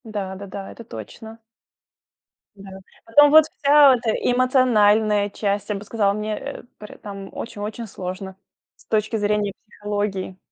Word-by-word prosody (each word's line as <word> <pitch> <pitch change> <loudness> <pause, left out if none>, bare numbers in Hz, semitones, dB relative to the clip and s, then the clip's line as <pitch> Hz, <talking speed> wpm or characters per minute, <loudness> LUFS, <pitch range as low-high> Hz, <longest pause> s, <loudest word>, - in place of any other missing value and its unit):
Да. 205 -4 -5
Да-да. 195 0 -8
Это 230 - -11
точно. 220 - -10 1.1
Да. 195 -1 -12 0.4
Потом 290 +5 +6
вот 315 0 +8
вся 285 -3 +5
эта 235 -2 -3
эмоциональная 220 -5 +2
часть, 200 0 -2
я 210 - -1
бы 200 +1 -7
сказала, 205 -2 +1
мне, 215 0 -3
э, - - -7
поре 210 - -12
там, 195 -1 -9
очень-очень 220 +1 -6
сложно 190 0 -7 0.4
с - - -24
точки 215 +1 -1
зрения 205 -1 0
психологии. 205 -3 -4
210 Hz, 135 wpm, -22 LUFS, 200-225 Hz, 1.1 s, вот